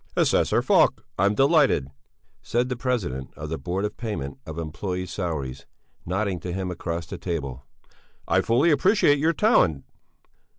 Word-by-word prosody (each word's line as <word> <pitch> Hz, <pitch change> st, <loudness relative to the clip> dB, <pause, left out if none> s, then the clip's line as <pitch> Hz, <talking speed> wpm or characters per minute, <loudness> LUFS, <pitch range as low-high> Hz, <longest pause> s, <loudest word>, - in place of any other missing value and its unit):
"Assessor -, -, +2 dB
Falk! -, -, +3 dB
I'm 100 Hz, +2 st, +3 dB
delighted!" 135 Hz, -, +3 dB, 0.5 s
said 120 Hz, +2 st, 0 dB
the 125 Hz, -, -1 dB
President 110 Hz, -, -2 dB
of 75 Hz, -, -6 dB
the 80 Hz, -, -3 dB
Board 95 Hz, +3 st, -2 dB
of 105 Hz, -, -5 dB
Payment 70 Hz, -, -5 dB
of 80 Hz, -, -6 dB
Employés' 90 Hz, +3 st, -4 dB
Salaries, 75 Hz, -10 st, -4 dB, 0.4 s
nodding 95 Hz, 0 st, -1 dB
to 90 Hz, -, -5 dB
him 95 Hz, 0 st, -3 dB
across 85 Hz, -1 st, -4 dB
the -, -, -8 dB
table. 70 Hz, -7 st, -4 dB, 0.6 s
"I 95 Hz, +2 st, +3 dB
fully 125 Hz, -, +3 dB
appreciate 145 Hz, -1 st, +4 dB
your 160 Hz, +3 st, +2 dB
talent." 115 Hz, -, +3 dB
90 Hz, 145 wpm, -25 LUFS, 80-125 Hz, 0.6 s, appreciate